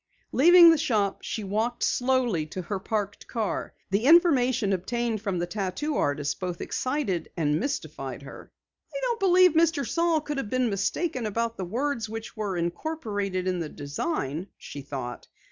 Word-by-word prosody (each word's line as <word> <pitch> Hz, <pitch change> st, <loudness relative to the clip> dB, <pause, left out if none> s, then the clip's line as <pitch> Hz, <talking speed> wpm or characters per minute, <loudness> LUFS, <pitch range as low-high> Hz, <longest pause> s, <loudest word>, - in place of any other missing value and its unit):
Leaving 340 Hz, +4 st, +8 dB
the 325 Hz, -, +2 dB
shop, 215 Hz, -10 st, 0 dB
she 220 Hz, -, -4 dB
walked 220 Hz, +5 st, -1 dB
slowly 245 Hz, -9 st, +1 dB
to 185 Hz, +4 st, -6 dB
her 190 Hz, +3 st, -3 dB
parked 205 Hz, 0 st, -3 dB
car. 220 Hz, -3 st, -2 dB, 0.2 s
The 200 Hz, +5 st, +1 dB
information 260 Hz, -, +5 dB
obtained 230 Hz, +3 st, -2 dB
from 195 Hz, -4 st, -2 dB
the 175 Hz, -, -1 dB
tattoo 205 Hz, -, -3 dB
artist 145 Hz, -, -1 dB
both 180 Hz, -2 st, -4 dB
excited 255 Hz, -, -2 dB
and 150 Hz, -2 st, +1 dB
mystified 280 Hz, +3 st, -4 dB
her. -, -, -11 dB, 0.4 s
"I -, -, -5 dB
don't 475 Hz, -2 st, 0 dB
believe 365 Hz, -2 st, +6 dB
Mr. 320 Hz, -5 st, +2 dB
Saal 335 Hz, -1 st, +2 dB
could 295 Hz, -1 st, -4 dB
have 220 Hz, -, -4 dB
been 255 Hz, -2 st, +1 dB
mistaken 245 Hz, -, -1 dB
about 230 Hz, +2 st, -1 dB
the 190 Hz, -, -4 dB
words 235 Hz, +3 st, -2 dB
which 225 Hz, +2 st, -7 dB
were 205 Hz, -4 st, -2 dB
incorporated 200 Hz, -, -2 dB
in 180 Hz, -1 st, 0 dB
the 160 Hz, -3 st, -3 dB
design," 145 Hz, -, -3 dB
she 145 Hz, -, -8 dB
thought. 130 Hz, -3 st, -6 dB
220 Hz, 160 wpm, -26 LUFS, 185-285 Hz, 0.4 s, Leaving